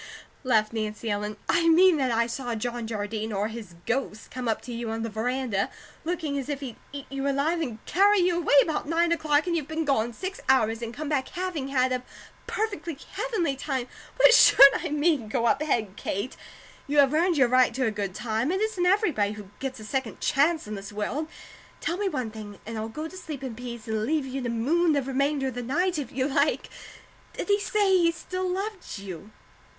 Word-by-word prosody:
'" - - -32
laughed 220 -4 +2
Nancy 215 0 -3
Ellen. 210 +1 -3
"I 335 -1 +3
mean 350 +1 +6
that 265 -3 +1
I 230 0 +2
saw 240 0 -4
John 235 +1 -3
Jardine 220 0 -3
or 205 +1 -1
his 220 -6 -9
ghost 225 -3 -2
come 255 -1 -4
up 225 - +1
to 245 - -7
you 230 -1 -4
on 225 0 -3
the 230 - -4
veranda, 230 -2 -1 0.3
looking 320 -4 -2
as 270 - -6
if 285 -2 -2
he'd 255 -5 -6
eat 280 -1 -7
you 275 0 -1
alive, 300 +5 +1
and 245 -8 -3
carry 405 +3 +4
you 350 -1 +2
away 310 -4 +2
about 310 -2 -2
nine 335 +2 +2
o'clock, 305 -3 +2
and 345 -1 0
you've 305 -4 -2
been 315 +1 -2
gone 240 -5 +1
six 375 - -6
hours 225 -3 +3
and 230 -1 -4
come 300 +5 -6
back 280 -3 0
having 350 -6 -3
had 260 -2 +1
a 255 -1 0 0.5
'perfectly 400 -8 -3
heavenly 360 - -1
time.' 265 -2 -2 0.3
What - - +7
should 275 - +9
I - - -2
mean! 295 -5 +1
Go 235 +2 0
up 270 +5 +3
head, 220 -10 0
Kate! 200 +7 -3 0.5
You 290 +1 -1
have 280 0 +6
earned 335 +1 +2
your 265 -3 +5
right 255 0 +4
to 260 0 +1
a 225 - +1
good 200 -3 -4
time. 225 +5 -1
It 380 - 0
isn't 415 -5 0
everybody 335 - +2
who 205 -2 -11
gets 265 -1 -4
a 215 - -9
second 260 0 -3
chance 305 +3 +2
in 215 - -6
this 200 0 -7
world. 210 +10 -3 0.5
Tell 340 - -2
me 405 -1 0
one 255 -9 -3
thing, 210 -2 -9
and 230 +2 -6
I'll 220 0 -3
go 305 +8 -5
to 360 - -12
sleep 305 -7 -7
in 260 -3 -4
peace 235 -1 -8
and 220 -1 -1
leave 300 +3 0
you 265 +1 -4
to 245 - -2
moon 305 +9 +2
the 285 -2 +1
remainder 270 +1 0
of - - -7
the 245 - -4
night, 340 +8 0
if 275 - -5
you 260 +1 0
like. 285 +1 +1 0.6
Did - - -5
he 405 0 +4
say 410 -2 +2
he 335 -2 +4
still 370 +2 -4
loved 390 - -4
you?" 195 -1 -8
270 Hz, 220 wpm, -26 LUFS, 225-325 Hz, 0.6 s, should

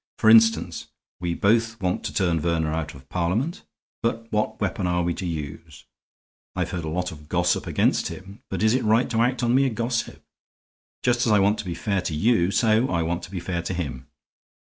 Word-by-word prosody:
For 110 - +5
instance, 115 0 +4 0.3
we 85 -1 -2
both 115 +3 +2
want 90 -2 -1
to - - -2
turn 85 -4 +1
Verner 80 -1 0
out 80 -2 -3
of 65 0 -15
Parliament, 100 - -1 0.4
but 115 -1 -1
what 105 0 -1
weapon 95 -2 -1
are 90 0 +1
we 85 0 0
to 90 - -4
use? 80 -1 -7 0.7
I've - - -2
heard 85 -2 -3
a - - -3
lot 90 +3 -2
of 75 -1 -13
gossip - - +1
against - - +1
him, 100 +3 -10
but - - -2
is 110 +1 +4
it 130 - +1
right 110 +3 +3
to 115 -1 +2
act 125 +1 +1
on 120 0 +2
mere 135 +1 +4
gossip? 115 0 -3 0.8
Just 120 -1 +2
as - - +3
I 105 - +5
want 100 +2 +3
to 110 - -4
be 85 -2 -4
fair 95 +2 -1
to 85 -3 -3
you, 100 0 +3
so 110 +3 +2
I 85 -2 0
want 85 +1 -2
to - - -14
be 95 -1 -4
fair 85 0 -3
to 90 +2 -4
him. 65 -7 -5
95 Hz, 210 wpm, -24 LUFS, 85-115 Hz, 0.8 s, For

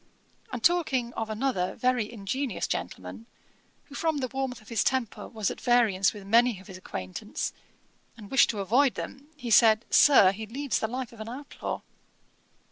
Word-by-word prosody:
And 245 -2 -5
talking 270 -9 +2
of 225 -1 -4
another 215 -5 -1
very 250 -4 0
ingenious 235 +3 -3
gentleman, 90 +4 -5 0.6
who 285 - -17
from 320 +1 0
the 260 -3 -2
warmth 265 -2 -3
of 215 - -17
his 230 -4 +1
temper 260 -4 -1
was 215 -3 -2
at - - -8
variance 225 -6 +3
with 205 -2 -11
many 230 0 +3
of 190 - -15
his 190 - -10
acquaintance, 95 - -5 0.6
and 210 -2 -12
wished 270 - +5
to 210 -3 -2
avoid 245 +7 +3
them, 275 +2 -7
he 245 -5 -5
said, 220 0 +6
'Sir, 235 -10 +7
he 215 +3 -7
leads 270 +2 -2
the 220 - -1
life 250 +1 -5
of 230 - -14
an 220 - -6
outlaw.' 275 +4 -6
230 Hz, 175 wpm, -27 LUFS, 205-260 Hz, 0.6 s, Sir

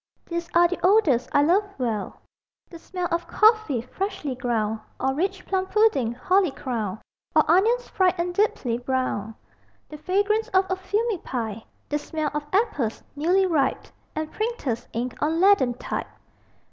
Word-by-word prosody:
These 340 0 -4
are 345 0 +6
the 365 - -4
odors 360 - +4
I 285 - +4
love 360 +7 +4
well: 225 -6 -3 0.5
The 335 - -10
smell 360 +1 -4
of 340 +1 -1
coffee 435 - +3
freshly 380 0 -4
ground; 225 -3 -1 0.2
Or 265 - +1
rich 375 +5 -2
plum 380 -1 -1
pudding, 380 - +2
holly 370 +8 +2
crowned; 230 -7 -4 0.4
Or 310 - +6
onions 445 +9 +3
fried 370 -2 +2
and 350 +1 -1
deeply 270 - 0
browned. 245 -4 -2 0.5
The 300 - -9
fragrance 410 +6 +1
of 375 +1 +5
a - - +2
fumy 400 +2 -1
pipe; 225 -4 -4 0.3
The 295 - 0
smell 305 0 -3
of 295 0 -3
apples, 370 - 0
newly 355 +6 +3
ripe; 305 -7 +1 0.3
And 310 0 -3
printers' 360 - -3
ink 240 +2 -3
on 315 +3 +1
leaden 350 -11 +4
type. - - -4
330 Hz, 155 wpm, -24 LUFS, 255-385 Hz, 0.5 s, are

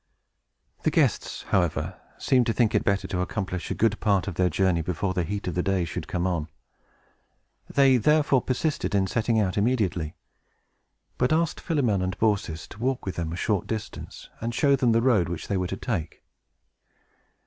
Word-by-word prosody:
The - - +2
guests, - - 0
however, 85 -4 0 0.2
seemed 125 -3 +2
to 115 - +2
think 115 -2 +2
it - - +2
better 100 0 0
to 90 -3 -2
accomplish 90 -2 -3
a - - -2
good 110 -1 +1
part 100 -3 +1
of 95 - -2
their 90 +2 +2
journey 90 0 +1
before 90 +3 -2
the 90 - 0
heat 100 +4 -4
of 90 - -1
the 90 - 0
day 95 -1 0
should - - -5
come 90 0 -1
on. 85 -4 -1 1.2
They, 135 -2 +5
therefore, 145 +1 +3
persisted 130 -3 -1
in 95 -1 +3
setting 110 +3 +1
out 100 -1 +1
immediately, 100 -9 0 1.0
but 125 +2 +2
asked 160 0 +1
Philemon 125 - +1
and 95 0 -2
Baucis 100 -7 0
to 105 - -12
walk 130 +2 0
forth - - -14
with 95 - -3
them 85 -2 -2
a - - -3
short 100 +1 -1
distance, 110 -2 -6
and 115 +1 -3
show 140 +2 +4
them 125 -3 +2
the 115 +1 +3
road 110 -10 +3
which 85 -2 -5
they 100 - -1
were 90 -1 0
to 95 - -4
take. 90 -10 -4
100 Hz, 190 wpm, -26 LUFS, 90-120 Hz, 1.2 s, They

